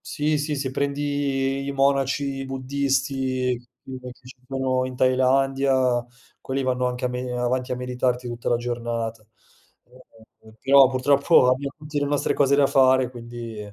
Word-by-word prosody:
Sì, 150 0 -1
sì, 150 0 -2
se 135 -2 -3
prendi 140 -1 -1
i - - -2
monaci 135 0 0
buddisti 130 -1 -1 0.3
che 130 -1 -8
partecipano 130 +1 -4
in 130 0 -6
Thailandia, 130 0 +2 0.4
quelli 135 +1 -3
vanno 125 -1 0
anche 125 0 -3
a - - +3
me 125 0 -4
ehm, 125 -1 -4
avanti 125 +1 -1
a - - 0
meditarti 125 0 -2
tutta 120 0 -4
la 120 - +3
giornata. 115 -2 -3 0.6
Eh, - - -35 0.6
eh, - - -13
eh, - - -17
però 135 0 +6
purtroppo 135 +1 +4
abbiam 140 +2 -1
tutti 150 -1 -4
le 145 - -1
nostre 145 0 0
cose 140 0 +3
da 140 0 +4
fare, 130 -2 +3
quindi, 120 -2 -8
130 Hz, 155 wpm, -23 LUFS, 125-140 Hz, 0.6 s, però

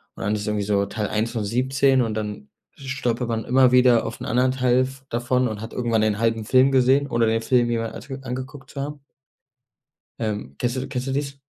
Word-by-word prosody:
Und - - -7
dann 105 +2 0
ist 105 0 -4
irgendwie 105 -1 0
so 100 -1 +1
Teil 105 +1 -3
1 110 +2 -1
von 115 -3 -2
17 130 +4 +2
und 115 -3 -1
dann 105 -1 -5 0.3
stolpert 130 -3 -2
man 115 -1 -2
immer 130 0 +4
wieder 125 -2 +5
auf 115 - -6
'n - - -4
anderen 125 +1 +2
Teil 130 0 +2
v 135 0 -10
davon 125 +2 +1
und 110 -2 -5
hat 110 - -8
irgendwann 115 -3 0
den 110 -1 +1
halben 115 -1 +1
Film 130 +4 +4
gesehen 135 +2 +3
ohne 115 -1 +2
den 115 0 +1
Film 120 0 +2
jemals 115 -1 -3
ans 135 0 -7
angeguckt 130 +2 -7
zu 140 - -5
haben. 145 0 -6 1.2
Ähm, 105 - -4
kennst 120 +1 -1
du 130 +1 -3
kennst 130 -1 -4
du - - -1
dies? 140 0 -3
125 Hz, 220 wpm, -23 LUFS, 110-130 Hz, 1.2 s, wieder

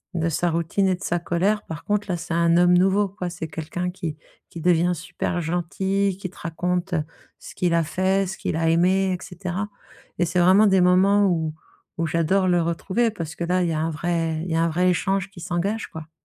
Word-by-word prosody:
de 165 -1 0
sa 175 +2 0
routine 170 +4 0
et 185 - +2
de 180 - -11
sa 175 -2 0
colère, 190 +5 0
par 160 -1 -8
contre 210 -1 -1
là 175 - 0
c'est 165 0 -5
un 170 0 +3
homme 180 0 +5
nouveau 195 +2 +3
quoi. 185 -2 -5
C'est 170 -2 -6
quelqu'un 175 +3 -4
qui 170 -4 -5 0.3
qui 170 - -9
devient 175 +1 +3
super 180 +1 -3
gentil, 185 +4 -1
qui 185 - -5
te 185 - -20
raconte, 180 +2 -2
heu, 160 - +1 0.4
ce - - -11
qu'il 175 -2 +1
a 165 -1 +3
fait, 190 +4 0
ce 190 - -6
qu'il 160 - -2
a 165 0 +1
aimé 185 +3 +3
et - - -12
cetera, 185 +3 -4 0.5
et 175 - +2
c'est 180 +2 0
vraiment 190 +4 +6
des 190 -2 +4
moments 195 +3 +4
où 160 -4 0 0.4
où 165 - 0
j'adore 170 +4 +1
le 175 -1 +3
retrouver 195 +7 0
parce 160 -5 -6
que 170 - -4
là 180 +1 +1
il 170 - 0
y - - -1
a 155 - -1
un 160 +1 0
vrai 165 0 -1
il 175 - -5
y 160 - +1
a 165 - +2
un 170 - +2
vrai 180 +3 +2
échange 195 +1 0
qui 190 -2 -13
s'engage 200 +5 -2
quoi. 160 0 -9
175 Hz, 235 wpm, -23 LUFS, 165-190 Hz, 0.5 s, vraiment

